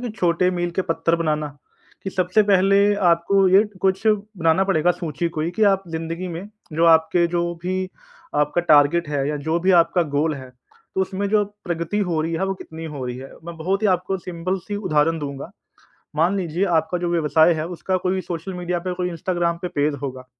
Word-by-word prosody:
कि -, -, -3 dB
छोटे 180 Hz, 0 st, +2 dB
मील 175 Hz, -1 st, -2 dB
के 190 Hz, -, +2 dB
पत्थर 165 Hz, +1 st, +1 dB
बनाना 155 Hz, -2 st, -1 dB, 0.5 s
कि 195 Hz, -, -4 dB
सबसे 185 Hz, +3 st, +2 dB
पहले 200 Hz, +2 st, +4 dB, 0.2 s
आपको 190 Hz, +3 st, +2 dB
ये 190 Hz, +3 st, +6 dB, 0.2 s
कुछ 190 Hz, +3 st, 0 dB
बनाना 200 Hz, -5 st, +2 dB
पड़ेगा 175 Hz, -3 st, +2 dB
सूची 170 Hz, -2 st, -2 dB
कोई 160 Hz, +2 st, -1 dB
कि 220 Hz, -, +1 dB
आप 195 Hz, 0 st, -1 dB
ज़िन्दगी 165 Hz, +2 st, -4 dB
में 195 Hz, +4 st, -9 dB, 0.2 s
जो 165 Hz, +2 st, +2 dB
आपके 165 Hz, +1 st, +4 dB
जो 170 Hz, 0 st, -1 dB, 0.2 s
भी 185 Hz, +1 st, -2 dB, 0.5 s
आपका 150 Hz, +3 st, +1 dB
टारगेट 150 Hz, +2 st, +5 dB
है 140 Hz, -2 st, -1 dB
या 150 Hz, -, -1 dB
जो 160 Hz, +4 st, -1 dB
भी 185 Hz, +2 st, +2 dB
आपका 170 Hz, +1 st, +1 dB
गोल 155 Hz, +2 st, +1 dB
है, 130 Hz, -2 st, -10 dB, 0.4 s
तो -, -, 0 dB
उसमें 190 Hz, +1 st, -1 dB
जो 210 Hz, 0 st, +3 dB, 0.2 s
प्रगति 170 Hz, +3 st, -2 dB
हो 160 Hz, -2 st, +1 dB
रही 165 Hz, +1 st, -2 dB
है 165 Hz, +3 st, 0 dB
वो 195 Hz, -, -1 dB
कितनी 165 Hz, -3 st, -10 dB
हो 145 Hz, -5 st, -6 dB
रही 125 Hz, -, -4 dB
है। 135 Hz, +1 st, -9 dB
मैं 170 Hz, -1 st, -8 dB
बहुत 190 Hz, +6 st, -1 dB
ही 215 Hz, -, +4 dB
आपको 185 Hz, +2 st, -4 dB
सिंपल 180 Hz, +2 st, -3 dB
सी 205 Hz, -, -2 dB
उदाहरण 165 Hz, -4 st, +1 dB
दूँगा। 140 Hz, -2 st, -6 dB, 0.7 s
मान 170 Hz, +6 st, +2 dB
लीजिए 175 Hz, +1 st, -1 dB
आपका 160 Hz, +3 st, -1 dB
जो 175 Hz, 0 st, -2 dB
व्यवसाय 160 Hz, 0 st, +4 dB
है 155 Hz, -1 st, -3 dB
उसका 185 Hz, +1 st, -2 dB
कोई 185 Hz, +1 st, +1 dB
सोशल 175 Hz, +1 st, -5 dB
मीडिया 180 Hz, -1 st, -2 dB
पे 180 Hz, +1 st, -4 dB
कोई 180 Hz, 0 st, -2 dB
इंस्टाग्राम 170 Hz, 0 st, -1 dB
पे 180 Hz, -, -2 dB
पेज 145 Hz, 0 st, +1 dB
होगा। 130 Hz, -2 st, -6 dB
170 Hz, 205 wpm, -22 LUFS, 160-185 Hz, 0.7 s, ये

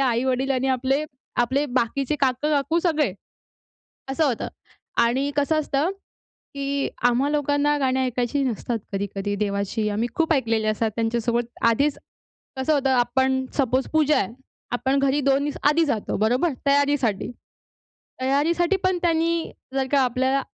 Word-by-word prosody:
आई-वडील 260 Hz, +3 st, 0 dB
आणि 265 Hz, 0 st, +1 dB
आपले 265 Hz, +3 st, +1 dB, 0.4 s
आपले 270 Hz, +5 st, 0 dB
बाकीचे 265 Hz, +3 st, -1 dB
काका-काकू 285 Hz, +4 st, +1 dB
सगळे, 310 Hz, -, +1 dB, 1.0 s
असं 310 Hz, +4 st, +1 dB
होतं. 250 Hz, -6 st, -1 dB, 0.6 s
आणि 265 Hz, +4 st, +1 dB
कसं 295 Hz, +2 st, +2 dB
असतं, 295 Hz, +3 st, 0 dB, 0.6 s
की 280 Hz, 0 st, -1 dB, 0.2 s
आम्हा 250 Hz, +4 st, +1 dB
लोकांना 290 Hz, 0 st, +1 dB
गाणी 265 Hz, -1 st, +1 dB
ऐकायची 255 Hz, +2 st, 0 dB
नसतात 235 Hz, -1 st, -2 dB
कधी-कधी 200 Hz, +1 st, -3 dB
देवाची. 200 Hz, +1 st, -1 dB
आम्ही 220 Hz, +4 st, -1 dB
खूप 325 Hz, 0 st, +2 dB
ऐकलेले 225 Hz, -6 st, +1 dB
असतात 215 Hz, +1 st, 0 dB
त्यांच्यासोबत 235 Hz, +1 st, 0 dB, 0.2 s
आधीच. 280 Hz, +5 st, +1 dB, 0.6 s
कसं 265 Hz, +4 st, +1 dB
होतं 275 Hz, -2 st, +1 dB
आपण 260 Hz, +1 st, +2 dB
सपोस 260 Hz, -1 st, +1 dB
पूजा 305 Hz, -1 st, +4 dB
आहे, 195 Hz, -, -1 dB, 0.4 s
आपण 265 Hz, +3 st, +1 dB
घरी 275 Hz, +1 st, +2 dB
2 275 Hz, +1 st, +2 dB
दिवस 290 Hz, -, -3 dB
आधी 325 Hz, +3 st, +3 dB
जातो 230 Hz, -8 st, -2 dB
बरोबर? 245 Hz, -, +2 dB, 0.2 s
तयारीसाठी. 280 Hz, -7 st, +1 dB, 0.9 s
तयारीसाठी 330 Hz, +8 st, +2 dB
पण 370 Hz, -1 st, +2 dB
त्यांनी 335 Hz, -1 st, +1 dB, 0.2 s
जर 265 Hz, -1 st, 0 dB
का 285 Hz, -, +4 dB
आपल्याला 260 Hz, +2 st, +1 dB
265 Hz, 135 wpm, -23 LUFS, 240-290 Hz, 1.0 s, पूजा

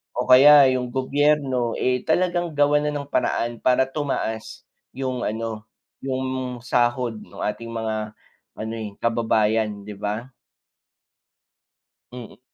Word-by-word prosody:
o 125 Hz, -, 0 dB
kaya 140 Hz, +3 st, +9 dB
yung 125 Hz, -1 st, -2 dB
gobyerno, 135 Hz, -2 st, +1 dB
eh, 125 Hz, -1 st, 0 dB
talagang 175 Hz, -1 st, 0 dB
gawan 145 Hz, +1 st, +3 dB
na -, -, 0 dB
ng 140 Hz, -1 st, -5 dB
paraan 120 Hz, 0 st, -1 dB
para 130 Hz, +1 st, +3 dB
tumaas 135 Hz, -6 st, -4 dB, 0.3 s
yung 130 Hz, -2 st, -3 dB
ano, 110 Hz, 0 st, -5 dB, 0.3 s
yung 130 Hz, -1 st, -3 dB
sahod 120 Hz, -2 st, 0 dB
ng -, -, -12 dB
ating 105 Hz, +2 st, -3 dB
mga 110 Hz, -1 st, -4 dB, 0.4 s
ano, 110 Hz, +1 st, -5 dB
eh, 105 Hz, -2 st, -6 dB
kababayan 110 Hz, -2 st, +1 dB
'di 105 Hz, 0 st, -8 dB
ba. 110 Hz, +5 st, -4 dB, 1.8 s
Mm. 120 Hz, -4 st, -10 dB
125 Hz, 120 wpm, -23 LUFS, 110-135 Hz, 1.8 s, kaya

